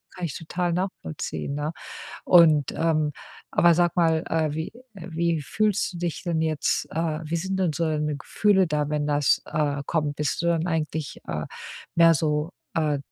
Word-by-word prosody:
Kann 180 - -3
ich 155 - -4
total 175 +2 -2
nachvollziehen, 140 - -4
ne? 150 +2 -2 0.5
Und, 155 -5 +6
ähm, 155 -2 +1 0.4
aber 170 -1 +5
sag 175 0 +2
mal, 165 -2 +3
äh, 160 -2 0
wie 160 +1 -3 0.3
äh, 185 -2 -9
wie 165 -1 0
fühlst 205 +4 0
du - - -6
dich 170 -2 -3
denn 170 -2 0
jetzt, 155 -2 0
äh, 160 -1 -1
wie 165 +2 -2
sind 190 +3 -2
denn 180 -4 +2
so 165 +3 -1
deine 150 -2 -1
Gefühle 190 +6 +2
da, 150 -1 0
wenn 150 -1 0
das, 145 -1 +2
äh, 145 -2 -1
kommt. 150 -3 -1
Bist 150 -1 -1
du - - 0
dann 170 0 +1
eigentlich, 155 -3 -2
äh, - - -2 0.5
mehr 165 0 +7
so, 150 +1 0 0.2
äh, 150 -3 +1
160 Hz, 180 wpm, -25 LUFS, 150-170 Hz, 0.5 s, mehr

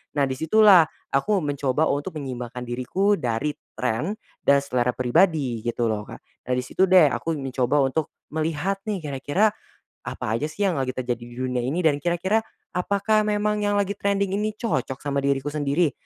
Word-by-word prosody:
Nah 145 - +2
di 130 -1 0
situlah 185 0 +6 0.2
aku 195 +9 +2
mencoba 145 0 0
untuk 145 +3 -3
menyeimbangkan 125 -4 -5
diriku 165 +12 0
dari 125 +3 -1 0.2
trend 125 - -1 0.2
dan 140 0 +4
selera 125 -3 0
pribadi 130 -1 +2
gitu 120 0 -1
loh 105 -1 -4
Kak. - - -9 0.3
Nah 125 - +1
di 125 - -1
situ 190 +8 +1
deh 185 0 +7
aku 165 -1 -2
mencoba 135 0 0
untuk 140 +3 -1 0.2
melihat 160 +5 -1
nih 200 -5 -2
kira-kira 145 +9 +1 0.6
apa 110 +2 -2
aja 150 - -1
sih 180 +7 -4
yang 180 -7 +1
lagi 130 -1 -2
terjadi 125 -2 -2
di 120 0 -11
dunia 125 0 -2
ini 140 +9 -1
dan 145 -3 +3
kira-kira 175 +6 +1 0.3
apakah 200 +4 +1
memang 210 0 +1
yang 205 0 +1
lagi 200 -1 +1
trending 200 -1 0
ini 215 0 -2
cocok 135 - -2
sama 140 -1 0
diriku 140 +1 0
sendiri? 145 +1 +1
145 Hz, 175 wpm, -24 LUFS, 130-190 Hz, 0.6 s, deh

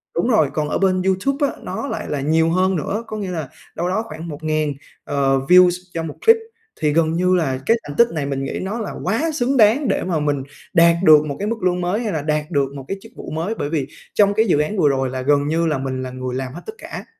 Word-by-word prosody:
đúng 170 - +1
rồi, 155 - +3
còn 150 -1 -1
ở - - 0
bên 185 -1 +2
YouTube 270 - +1
á - - -4
nó 280 - -4
lại - - -4
là 145 -2 -2
nhiều 160 +3 +2
hơn 185 +2 +2
nữa, 195 +8 -2
có 215 - -5
nghĩa 195 -3 -4
là 160 -6 -4 0.3
đâu 175 +2 -1
đó 220 +4 0
khoảng 160 -1 -8
1000, 155 -1 -2 0.3
ờ, 135 -1 +1
views 180 0 +8 0.2
cho 165 - -3
một 155 -2 -6
clip. 455 0 +8 0.4
Thì 150 -1 +2
gần 160 -1 +2
như 180 +2 +2
là 135 -7 0
cái 230 - +4
thành 145 - -8
tích 235 - +6
này 155 -3 -2
mình 135 -1 -2
nghĩ 135 - -4
nó 200 +5 -3
là 215 - -4
quá 295 +9 0
xứng 270 -1 0
đáng 230 +5 +4
để 200 - 0
mà 175 -3 -1
mình 145 -2 -1 0.3
đạt 170 -2 +6
được 155 -3 +7
một 145 -2 -4
cái 205 - -2
mức 225 -2 -3
lương 180 -1 +1
mới 185 +6 -1
hay 215 - -2
là 155 - -1
đạt 150 +2 -2
được 140 -3 0
một 135 -2 -8
cái 195 - -3
chức 225 +2 -14
vụ - - -8
mới, 170 +8 -2
bởi 145 - -3
vì 150 -4 -1 0.3
trong 205 -1 +4
cái 220 +2 +2
dự 160 -6 +3
án 155 +8 -1
vừa 150 -6 +4
rồi 135 -1 0
là 130 0 -4
gần 145 +2 +2
như 165 +2 +1
là 150 -3 0
mình 130 -1 -3
là 130 - -5
người 130 0 -5
làm 130 -1 -4
hết 175 - -8
tất - - -5
cả. - - -8
165 Hz, 270 wpm, -20 LUFS, 145-195 Hz, 0.4 s, views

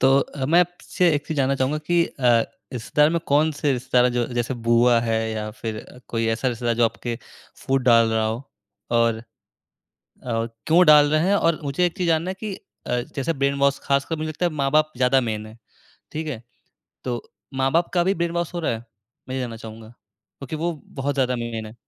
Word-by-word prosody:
तो 135 +1 +5
अ, 140 -1 -4
मैं 170 +5 +5
आपसे 175 0 0
एक 145 - -2
चीज़ 160 - -4
जानना 135 -1 +2
चाहूँगा 135 +3 0
कि 170 +2 +2
अ, 120 -4 +2 0.3
रिश्तेदार 150 +5 +2
में 170 - +1
कौन 150 +3 +3
से 145 -1 0
रिश्तेदार 125 -1 +2
हैं 125 - +2
जो 120 -1 0
जैसे 120 +2 -1
बुआ 120 0 +5
है 115 -1 0
या 110 -1 -4
फ़िर 110 -1 -6 0.2
कोई 115 -1 -1
ऐसा 115 +3 0
रिश्तेदार 120 -1 -1
जो 120 +1 +3
आपके 115 +1 -2 0.4
फूट 135 0 -1
डाल 115 -2 +5
रहा 110 0 +1
हो 110 +3 -3 0.5
और, 115 -1 +2 1.0
और 115 -2 -1 0.2
क्यों 175 +3 +6
डाल 150 -2 +7
रहे 155 +3 +2
हैं? 200 - +4
और 165 -5 +2
मुझे 140 +5 +1
एक 175 - -3
चीज़ 180 -2 -1
जानना 165 +2 +1
है - - -2
कि 215 -2 -4 0.3
अ, 125 - 0 0.2
जैसे 140 +4 -1
ब्रेनवॉश 140 0 +1
खासकर 140 +4 0
मुझे 155 0 -3
लगता 155 +3 -2
है 175 - +1
माँ-बाप 155 +1 +1
ज़्यादा 130 +1 +3
मेन 110 -3 -3
है। 110 +1 -13 0.6
ठीक 160 +1 -4
है? 125 -7 -5 0.6
तो 120 -2 -3 0.3
माँ-बाप 135 +6 +1
का 175 -1 +3
भी 190 +2 +2
ब्रेनवॉश 170 0 -2
हो 175 - -2
रहा 160 - 0
है? 115 0 -6 0.4
मैं 130 - -4
ये - - -1
जानना 120 -3 -4
चाहूँगा 110 0 -10
क्योंकि 110 +6 -11
वो 170 +2 -1
बहुत 140 +1 -3
ज़्यादा 130 -2 +1
मेन 115 -2 -4
है। 110 - -11
135 Hz, 205 wpm, -23 LUFS, 115-155 Hz, 1.0 s, डाल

